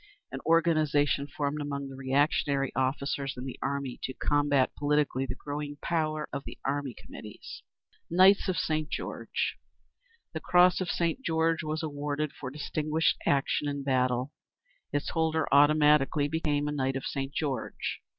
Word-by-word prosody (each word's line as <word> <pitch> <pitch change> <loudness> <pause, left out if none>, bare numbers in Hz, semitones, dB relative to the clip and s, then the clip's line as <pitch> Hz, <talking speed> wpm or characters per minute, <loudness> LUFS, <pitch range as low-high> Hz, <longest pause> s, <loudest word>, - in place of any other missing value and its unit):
_ - - -30 0.3
An 135 - -5
organisation 155 -4 +3
formed 145 0 -2
among 140 -1 -4
the 135 - -9
reactionary 135 0 +1
officers 135 +1 -1
in 125 - -6
the 130 - -7
army 140 -2 -3
to 130 - -4
combat 145 -2 +2
politically 145 -2 +1
the 125 - -4
growing 145 0 -5
power 155 -2 -1
of 140 -1 -3
the - - -9
Army 140 -2 -2
Committees. 105 -1 -10 0.5
Knights 190 +4 +5
of 180 - 0
St. 155 -1 -1
George. - - -3 0.7
The - - -3
Cross 180 +1 +4
of 185 - -2
St. 170 +9 0
George 165 -2 +1
was 155 +1 -3
awarded 145 -1 -3
for 130 0 -6
distinguished 155 +3 0
action 140 +1 +1
in 140 -1 -3
battle. 130 0 +1 0.6
Its 145 0 -2
holder 160 -1 +1
automatically 150 0 +5
became 150 -1 0
a - - -1
_"Knight 135 -2 -1
of 135 - -4
St. 135 -1 -3
George." 140 -5 -3
145 Hz, 150 wpm, -29 LUFS, 135-155 Hz, 0.7 s, Knights